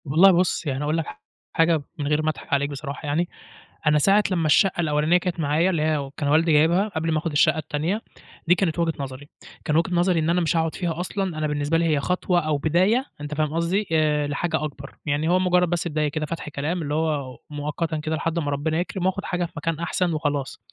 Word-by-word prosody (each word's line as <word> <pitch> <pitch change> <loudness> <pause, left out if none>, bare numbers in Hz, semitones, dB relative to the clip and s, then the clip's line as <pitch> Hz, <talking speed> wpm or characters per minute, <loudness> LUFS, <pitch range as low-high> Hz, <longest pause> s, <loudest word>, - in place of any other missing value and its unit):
والله 165 +7 +6
بُص، 175 -1 +1
يعني 135 -1 -2
أقول 150 +2 0
لك 165 - -1
ح 85 0 -10 0.3
حاجة 165 -1 +3 0.2
من 145 - -2
غير 150 +1 +2
ما 155 - +1
أضحك 155 - -5
عليك 140 0 +2
بصراحة 140 +1 -6
يعني، 155 +4 0 0.6
أنا 150 0 +5
ساعة 200 +7 +4
لمّا 170 -3 +1
الشَّقَّة 175 +4 +3
الأولانية 155 +2 +2
كانت 180 -1 -3
معايا، 155 +4 +2
اللي 170 -5 0
هي 150 -3 0
كان 145 - -1
والدي 160 +3 +3
جايبها، 165 +7 +4
قبل 165 -5 -2
ما 155 - +1
آخُد 160 +1 -3
الشّقّة 155 +2 +3
التانية، 155 +7 -2 0.5
دي 180 - +6
كانت 175 -3 -1
وجهة 165 -1 +1
نظري، 140 +1 -7 0.4
كان 150 - 0
وجهة 170 +3 +2
نظري 175 0 +2
إن 160 +1 0
أنا 175 +1 +2
مش 165 0 +1
هاقعد 160 -1 0
فيها 170 -3 -3
أصلًا، 185 -2 -3
أنا 155 0 0
بالنسبة 150 +2 0
لي 165 - +1
هي 155 -3 +2
خطوة 180 +3 +1
أو 155 -3 0
بداية، 185 - +2 0.2
أنت 145 0 -5
فاهم 155 0 0
قصدي، 175 +5 0
آآ 150 -2 +2
لحاجة 160 +2 -1
أكبر، 140 -2 -7
يعني 150 +2 0
هو 180 +1 +4
مُجرّد 180 -1 +3
بس 175 0 -1
بداية 155 -2 0
كده 155 +1 -3
فتح 165 -1 -5
كلام، 150 +5 -2
اللي 145 -2 -3
هو 150 -5 -1
مؤقتًا 150 +2 -3
كده 155 +1 -2
لحد 165 +2 -1
ما 145 -3 -2
ربنا 155 +3 -1
يكرم، 180 +1 -3
وآخد 190 +1 -1
حاجة 175 -1 -1
في 170 - -10
مكان 160 +1 -2
أحسن 170 0 0
وخلاص، 145 -3 -2
160 Hz, 230 wpm, -24 LUFS, 150-175 Hz, 0.6 s, والله